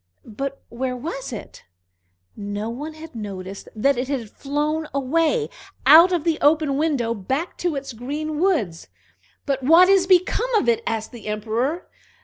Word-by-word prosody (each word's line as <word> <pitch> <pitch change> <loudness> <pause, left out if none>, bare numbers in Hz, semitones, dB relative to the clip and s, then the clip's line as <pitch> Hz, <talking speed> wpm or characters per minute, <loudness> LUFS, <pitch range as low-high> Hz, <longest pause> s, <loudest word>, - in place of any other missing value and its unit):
But 275 +5 -5
where 250 +2 -3
was 270 0 -5
it? 225 - -9 0.7
No 205 +2 -4
one 300 +6 -6
had 320 +1 -11
noticed 195 -3 -7
that 260 +4 +2
it 250 - -2
had 250 -6 -3
flown 300 +2 -2
away, 330 - +1 0.4
out 325 +6 +9
of 345 -4 0
the 330 -2 0
open 295 -1 +3
window, 275 -6 0
back 265 - -3
to 350 -4 -1
its 275 -2 -5
green 295 +6 -4
woods. 275 - 0 0.6
"But 275 -1 -1
what 330 +7 +6
is 385 -2 +4
become 375 +7 +3
of 420 - +2
it?" 235 -1 +3
asked 220 -1 -2
the 230 -3 -10
Emperor. 230 +10 -2
275 Hz, 155 wpm, -22 LUFS, 230-320 Hz, 0.7 s, out